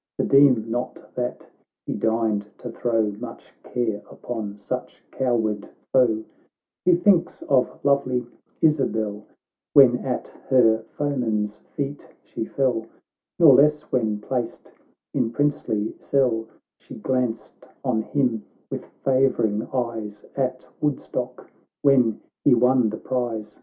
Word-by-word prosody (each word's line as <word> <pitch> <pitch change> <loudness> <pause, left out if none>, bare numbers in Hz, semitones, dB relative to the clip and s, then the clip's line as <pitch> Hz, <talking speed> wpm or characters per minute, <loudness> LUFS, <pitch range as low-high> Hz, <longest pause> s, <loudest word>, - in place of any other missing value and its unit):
— - - -68
(For - - +1
deem 135 -5 +5
not 120 +1 -4
that 125 0 -3 0.4
he - - -2
deigned 110 -2 0
to 120 - -7
throw 115 -3 0
Much 120 -1 -9
care 115 -4 -2
upon 105 -4 -6
such 100 - -6
coward 110 -5 0 0.2
foe,) 115 -4 +4 0.3
— - - -66
He 180 - +6
thinks 175 0 +2
of 130 -2 +1
lovely 130 -3 +2 0.4
Isabel, 110 -9 +1 0.5
AY - - +13
hen 125 -2 +3
at 130 -2 -3 0.2
her 115 -4 +5
foeman's 110 -8 -1 0.2
feet 140 0 -4
she 110 - -5
fell, 125 -4 0 0.5
Nor 160 -5 +8
less 150 +3 +5
when, 110 -4 +1
placed 120 +2 -4 0.4
in 115 - +1
princely 115 -5 0
sclle, 120 -5 +1 0.3
She - - -11
glanced 125 -3 -2 0.2
on 120 -4 +1
him 120 -2 0 0.3
with - - -4 0.2
favouring 125 -5 +2
eyes, 115 -5 -3
At 130 -1 -1 0.2
Woodstock 130 -3 -3 0.3
when 125 -6 +4 0.2
he 135 - +6
won 125 -1 +4
the 110 - -5
prize. 115 -5 -3
120 Hz, 125 wpm, -24 LUFS, 110-135 Hz, 0.5 s, AY